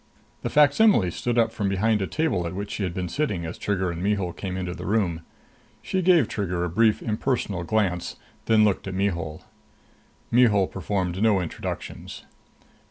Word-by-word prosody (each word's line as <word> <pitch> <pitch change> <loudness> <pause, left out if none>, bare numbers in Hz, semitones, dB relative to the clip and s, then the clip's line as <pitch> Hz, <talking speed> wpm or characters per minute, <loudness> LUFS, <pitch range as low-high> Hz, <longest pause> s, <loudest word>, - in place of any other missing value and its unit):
The - - -2
facsimile 145 - +4
stood 120 +6 -2
up 115 -1 +3
from 100 -3 -2
behind 105 +2 +1
a 95 - -1
table 150 - 0
at 85 - -6
which 100 +1 -5
she - - -4
had 95 -3 -1
been 90 -1 -2
sitting 100 - -2
as 80 - -5
Trigger 95 -3 -1
and 85 0 -6
Mihul 100 -3 0
came 95 -2 -5
into 90 -1 -3
the - - -7
room. 95 -6 0 0.6
She 190 - -1
gave 170 -8 +4
Trigger 90 -4 -2
a 90 - -1
brief, 110 +4 +2
impersonal 110 -5 -1
glance, 90 -2 -1 0.3
then 110 -1 +5
looked 100 -2 0
at 95 - -4
Mihul. 85 -5 -2 0.9
Mihul 110 -5 +4
performed 95 -1 -3
no 110 -3 +4
introductions. 90 -3 -6
100 Hz, 170 wpm, -25 LUFS, 90-110 Hz, 0.9 s, then